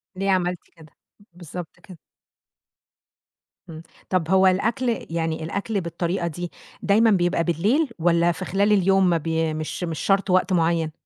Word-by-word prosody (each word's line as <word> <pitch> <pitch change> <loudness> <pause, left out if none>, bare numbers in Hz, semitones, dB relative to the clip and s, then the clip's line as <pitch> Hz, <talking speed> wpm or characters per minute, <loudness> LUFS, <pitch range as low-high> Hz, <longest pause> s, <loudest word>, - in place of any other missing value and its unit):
ليه 195 +1 0
عملتِ 180 -1 0 0.2
كده؟ 160 -3 -17 0.4
بالضبط 175 0 -9
كده. 175 0 -14 1.7
إمم. 160 -1 -9 0.3
طَب 180 -4 0
هو 190 0 +5
الأكل 225 +5 0
يعني 160 -1 -2
الأكل 200 +4 -3
بالطريقة 170 +1 -2
دي، 175 +1 -6 0.3
دايمًا 220 +3 +4
بيبقى 175 -3 +1
بالليل 210 - +1
والّا 170 +1 +3
في 165 - -6
خلال 200 +2 +1
اليوم 195 -2 +3
ما 170 - +2
بي 160 0 -1
مش 155 +3 -5
مش 165 -3 -4
شَرط 195 0 +1
وقت 185 +1 +2
معيّن؟ 165 -2 +1
175 Hz, 145 wpm, -23 LUFS, 165-195 Hz, 1.7 s, هو